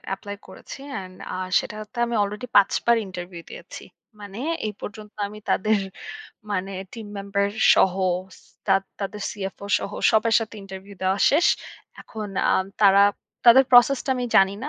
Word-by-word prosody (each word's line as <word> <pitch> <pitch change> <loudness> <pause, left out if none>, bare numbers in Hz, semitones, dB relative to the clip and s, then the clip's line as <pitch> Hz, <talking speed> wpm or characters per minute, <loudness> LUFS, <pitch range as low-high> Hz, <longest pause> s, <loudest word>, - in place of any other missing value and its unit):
Apply 200 +1 -8
করেছি 190 - -11
and 185 -4 -7 0.2
a - - -3 0.2
সেটাতে 215 +2 -8
আমি 235 - -3
আলরেডি 210 +4 -3
পাঁচবার 220 +4 +4
ইন্টারভিউ 175 -2 -8
দিয়েছি। - - -10 0.4
মানে 205 +1 -9 0.3
এই 210 - -4
পর্যন্ত 210 0 -9
আমি 210 +1 -11
তাদের 215 +1 +2 0.7
মানে 195 -1 -2 0.2
টিম 225 -3 -8
মেম্বার 200 0 -1 0.3
সহ 185 - +3 0.4
সি - - -21 0.2
তা - - +4 0.3
তাদের 205 +1 -5
সিএফও 200 0 -6
সহ - - -6 0.2
সবার 220 0 +2
সাথে 225 0 -6
ইন্টারভিউ 195 +1 -10
দেওয়া 190 +1 +1
শেষ। 310 +5 +4 0.5
এখন 215 -2 -7 0.2
আ - - +4 0.3
তারা 200 0 +7 0.4
তাদের 250 +3 +8
প্রসেস 250 +2 +7
টা 270 - -2
আমি 250 - -2
জানি 195 0 +5
না। 295 - -3
205 Hz, 155 wpm, -23 LUFS, 195-220 Hz, 0.7 s, তাদের